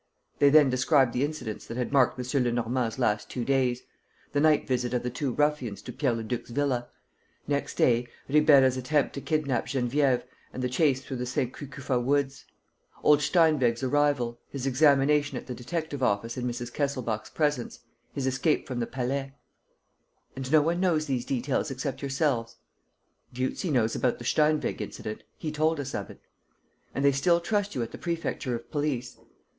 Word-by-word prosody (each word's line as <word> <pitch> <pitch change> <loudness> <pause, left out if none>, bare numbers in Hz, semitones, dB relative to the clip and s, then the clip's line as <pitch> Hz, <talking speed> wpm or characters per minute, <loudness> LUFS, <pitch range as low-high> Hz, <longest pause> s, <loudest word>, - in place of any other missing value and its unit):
They 140 - +6
then 145 -2 +6
described 130 -1 +3
the 125 - +1
incidents 145 -8 -4
that 115 - -6
had 125 - -2
marked 130 -3 +4
M. 125 +1 0
Lenormand's 120 0 -1
last 105 -5 0
two 120 -2 -3
days: 130 -2 +1 0.5
the 145 - +1
night 155 0 +3
visit 125 -1 0
of 120 - -1
the 125 - -2
two 130 +2 -2
ruffians 140 -7 0
to - - -7
Pierre 135 -4 +1
Leduc's 115 +1 -4
villa; 125 -1 -1 0.6
next 145 -1 -1
day, 120 0 +3 0.2
Ribeira's 140 -3 +5
attempt 140 +3 +1
to 140 - -5
kidnap 140 -6 -1
Geneviève 130 0 +1 0.3
and 130 - -5
the 125 - 0
chase 135 0 +2
through 130 - -5
the 125 0 -3
Saint 125 0 -1
Cucufa 135 -2 -3
woods; 135 +2 0 0.6
old 150 -1 +6
Steinweg's 140 -7 +3
arrival, 130 -4 +1
his 135 -2 -5
examination 145 +1 +3
at - - -7
the 125 - -5
detective 145 +3 -4
office 115 -1 0
in 125 -1 -2
Mrs. 120 0 -5
Kesselbach's 130 -7 -2
presence, 145 -6 -1 0.3
his 140 - -3
escape 135 +4 +1
from 125 -2 -3
the 115 - -1
Palais.... 135 +2 -3 1.0
"And 135 0 -5
no 155 -2 +6
one 170 +3 0
knows 170 -5 +2
these 130 -4 -2
details 135 +3 -1
except 135 0 -4
yourselves?" 135 -4 -1 0.8
"Dieuzy 130 +8 -2
knows 120 -6 +1
about 125 - +1
the 120 - -9
Steinweg 155 +3 +1
incident: 110 - -6 0.2
he 155 - -4
told 155 +1 +1
us 140 -1 -4
of - - -4
it." - - -12 0.8
"And 140 - 0
they 140 - +6
still 170 +6 +3
trust 205 +3 -1
you 125 - 0
at 115 - -7
the - - -9
Prefecture 165 -7 -2
of 120 0 -9
Police?" 145 -5 -2
135 Hz, 175 wpm, -27 LUFS, 125-145 Hz, 1.0 s, They